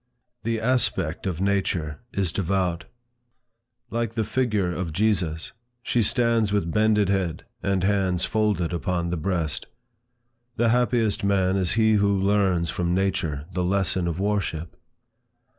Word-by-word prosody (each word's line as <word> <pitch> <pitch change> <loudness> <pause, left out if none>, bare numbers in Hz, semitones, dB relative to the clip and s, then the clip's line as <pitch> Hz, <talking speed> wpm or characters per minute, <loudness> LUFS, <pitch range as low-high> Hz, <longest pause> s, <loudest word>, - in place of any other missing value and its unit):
The 115 0 -1
aspect 110 -9 0
of 90 -2 -3
nature 90 -6 0
is 95 -4 0
devout. 90 -1 -1 1.1
Like 115 -1 -2
the 110 - +1
figure 105 -5 0
of 85 -2 -3
Jesus, 90 -5 0 0.3
she 120 - +1
stands 115 -1 +2
with 100 -5 0
bended 105 -1 +3
head, 90 -4 -1 0.2
and 95 -2 0
hands 95 -3 +1
folded 105 -6 0
upon 85 0 -1
the - - 0
breast. 85 -3 -2 0.9
The 120 -1 +2
happiest 120 -3 +1
man 95 -1 +2
is 95 -3 +1
he 110 -1 +3
who 100 -1 +2
learns 95 -4 +2
from 85 0 -1
nature 90 -7 -1
the 90 +1 0
lesson 95 -1 +1
of 85 +1 -3
worship. 95 -5 -2
95 Hz, 135 wpm, -25 LUFS, 85-105 Hz, 1.1 s, bended